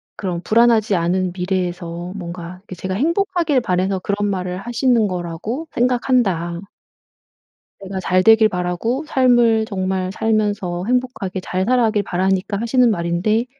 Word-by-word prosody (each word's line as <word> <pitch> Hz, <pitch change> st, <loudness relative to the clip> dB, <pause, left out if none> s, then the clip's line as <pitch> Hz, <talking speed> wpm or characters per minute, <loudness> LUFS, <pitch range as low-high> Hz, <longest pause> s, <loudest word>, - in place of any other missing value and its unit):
그런 180 Hz, -4 st, -4 dB
불안하지 225 Hz, -1 st, +3 dB
않은 180 Hz, +1 st, 0 dB
미래에서 180 Hz, -1 st, -3 dB
뭔가 175 Hz, -1 st, -7 dB
이렇게 190 Hz, -1 st, -11 dB
제가 185 Hz, +2 st, -4 dB
행복하길 335 Hz, -, +1 dB
바래서 190 Hz, -2 st, 0 dB
그런 205 Hz, +2 st, -1 dB
말을 180 Hz, -2 st, -3 dB
하시는 240 Hz, 0 st, +1 dB
거라고 180 Hz, -, -4 dB
생각한다." 235 Hz, -9 st, +1 dB, 1.2 s
"내가 190 Hz, 0 st, -5 dB
잘 185 Hz, 0 st, +1 dB
되길 220 Hz, -1 st, +6 dB
바라고 180 Hz, -, -2 dB
삶을 240 Hz, -5 st, +3 dB
정말 190 Hz, -2 st, -2 dB
살면서 205 Hz, -5 st, -1 dB
행복하게 245 Hz, -6 st, -1 dB
잘 185 Hz, +1 st, -2 dB
살아가길 225 Hz, -3 st, +2 dB
바라니까 190 Hz, +2 st, -1 dB
하시는 240 Hz, +2 st, +3 dB
말인데 185 Hz, +4 st, 0 dB
195 Hz, 325 characters per minute, -19 LUFS, 180-235 Hz, 1.2 s, 되길